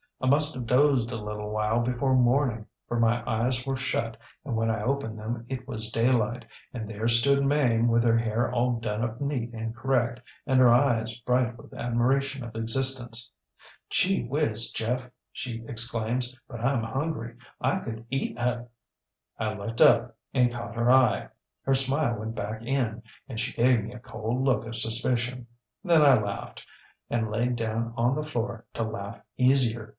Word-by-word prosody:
ŌĆ£I 130 - +1
must 150 +3 +3
have 125 -2 -5
dozed 125 -2 +3
a - - -3
little 105 0 -5
while 110 +2 +1
before 125 +2 +1
morning, 125 -2 +2 0.2
for 120 - -1
my 115 0 +2
eyes 120 +3 0
were 135 -1 -1
shut, 115 -4 -2 0.3
and 130 -5 -2
when 115 0 +1
I 110 -1 0
opened 125 -3 -1
them 115 +2 -5
it 130 -1 -5
was 110 -4 -5
daylight, 120 0 +1 0.3
and 110 -4 -5
there 110 +1 -3
stood 140 +4 +4
Mame 130 -5 +3
with 115 0 +3
her 115 -1 +4
hair 115 +1 0
all 125 -1 +1
done 110 0 -2
up 115 0 -3
neat 135 -5 -2
and 115 0 -5
correct, 120 -1 0 0.2
and 130 -2 +3
her 125 -2 +7
eyes 120 -4 +2
bright 125 0 +1
with - - -14
admiration 130 +3 0
of 115 -1 -9
existence. 120 0 -1 0.6
ŌĆ£ŌĆśGee 185 -10 +2
whiz, 120 -6 0
Jeff! 125 +3 -1
ŌĆÖ 125 - -18 0.2
she 115 -2 -5
exclaims, 120 +2 -1
ŌĆśbut 120 - -7
IŌĆÖm 120 -3 0
hungry. 135 -5 -3 0.2
I - - +1
could 115 0 -7
eat 135 -3 -2
aŌĆöŌĆÖ 120 0 -1 0.7
ŌĆ£I 110 -1 -2
looked 115 +3 -4
up 115 0 +5 0.2
and 125 -2 +4
caught 120 -1 -6
her 120 +1 +3
eye. 130 0 +4 0.3
Her 135 - +2
smile 135 -2 +1
went 110 +1 -5
back 105 +1 -4
in 120 -3 -1 0.3
and 115 -5 -5
she 115 - -2
gave 120 -2 +3
me 115 - -7
a 125 - -9
cold 125 0 -3
look 130 -4 +2
of 115 - -5
suspicion. 120 +2 0 0.4
Then 170 -5 +5
I 140 -2 +8
laughed, 100 -2 -5 0.5
and 115 -2 -1
laid 120 +3 0
down 115 0 -2
on 120 +3 +2
the 150 - -2
floor 120 -6 -3
to 115 - 0
laugh 110 0 -5 0.2
easier. 125 -4 +2
120 Hz, 180 wpm, -27 LUFS, 115-130 Hz, 0.7 s, I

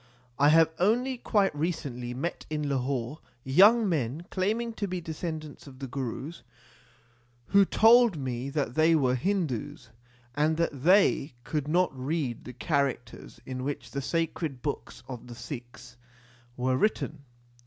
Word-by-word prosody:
I 145 +1 +6
have 160 +1 +5
only 245 +7 +1
quite 200 -9 +1
recently 145 -6 -3
met 170 +7 -4
in 150 -1 -2
Lahore 135 +1 -2 0.2
young 205 - +6
men 155 -1 -1
claiming 220 +5 -1
to 205 -2 -3
be 185 -1 -3
descendants 160 -3 -6
of 130 -2 -12
the 135 - -6
Gurus, 135 +4 -5 1.1
who 200 0 +6
told 230 -2 +5
me 130 -1 -3
that 140 -4 -2
they 160 +3 +4
were 130 -5 +2
Hindus, 130 - -2 0.4
and 155 +3 +1
that 155 -5 -1
they 175 -5 +4
could 150 +1 -3
not 175 -1 +2
read 130 -2 -3
the 125 - -8
characters 140 -2 -2
in 130 -1 -5
which 145 +1 -4
the 140 - -3
sacred 160 -2 -2
books 145 -1 -5
of 125 -2 -8
the 120 - -9
Sikhs 120 0 -9 0.6
were 130 +1 +1
written. 155 -5 0
150 Hz, 145 wpm, -28 LUFS, 130-175 Hz, 1.1 s, I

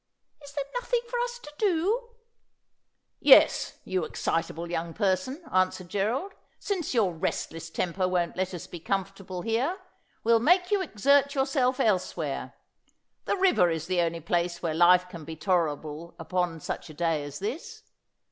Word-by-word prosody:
' - - -28
Is 285 - -10
there 285 -2 -2 0.2
nothing 485 -1 0
for 480 +1 -2
us 485 0 -2
to 300 -11 -12
do? 415 +5 +1 0.5
' - - -52
'Yes, - - +6
you 185 -2 -1
excitable 165 +1 -2
young 170 -1 -3
person,' 205 - 0
answered 185 -1 +1
Gerald; 225 - -1 0.2
' - - -41
since 355 -9 -1
your 200 -6 +3
restless 165 0 -3
temper 180 +2 -1
won't 175 -2 0
let 185 0 -2
us 170 - -7
be 175 - -9
comfortable 195 0 -3
here, 250 +11 0 0.5
we'll 230 0 +5
make 360 - +3
you 405 -2 +3
exert 280 - +3
yourself 265 -2 +1
elsewhere. 180 -8 -1 0.7
The - - 0
river 365 - +4
is 160 -2 -2
the 180 -1 +1
only 165 0 -1
place 170 +1 -1
where 165 -2 0
life 180 +2 +5
can 170 -3 -9
be 160 +2 -7
tolerable 160 -2 -1
upon 175 0 -2
such - - -5
a 155 - -11
day 165 -2 0
as 145 0 -7
this. 225 - -5
185 Hz, 165 wpm, -27 LUFS, 170-280 Hz, 0.7 s, Yes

